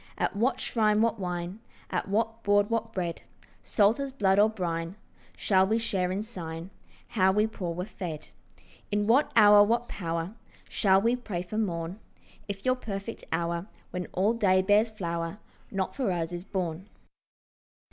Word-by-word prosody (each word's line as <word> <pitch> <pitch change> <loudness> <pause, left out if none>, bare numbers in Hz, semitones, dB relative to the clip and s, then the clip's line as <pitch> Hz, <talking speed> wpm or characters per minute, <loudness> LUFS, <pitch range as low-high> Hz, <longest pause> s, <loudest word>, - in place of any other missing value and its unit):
At - - -1
what 240 +4 +1
shrine 215 -4 +2
what 230 -1 +1
wine, 180 +1 -4 0.3
At 180 - -1
what 225 +3 0
board 205 0 +3
what 230 0 -1
bread, 175 -4 -3 0.4
Salt 215 +4 +3
as 275 -1 -3
blood 200 -7 +2
or 210 +1 +6
brine, 170 -4 -3 0.4
Shall 190 -2 +3
we 220 +3 +2
share 195 -6 0
in 195 +3 -2
sign 170 -5 -7 0.4
How 190 -4 +3
we 210 +2 +3
poor 180 -6 -4
were 180 +1 -3
fed? 175 -7 -6 0.6
In 205 0 +1
what 245 +7 +4
hour 205 -2 +8
what 235 +3 +1
power 165 +1 -3 0.3
Shall 190 -3 +3
we 230 +4 +2
pray 210 -8 -4
for 215 +5 -4
morn, 175 -2 -2 0.5
If 200 -1 -6
your 255 0 +3
perfect 205 -1 -6
hour, 170 +2 -1 0.2
When 180 -1 -4
all 200 +5 +1
day 190 -5 +3
bears 210 +3 +4
flower, 170 -3 -4 0.3
Not 195 -2 -2
for 255 -8 0
us 170 -1 -2
is 175 +1 -5
born? 185 0 -3
200 Hz, 165 wpm, -28 LUFS, 180-220 Hz, 0.6 s, hour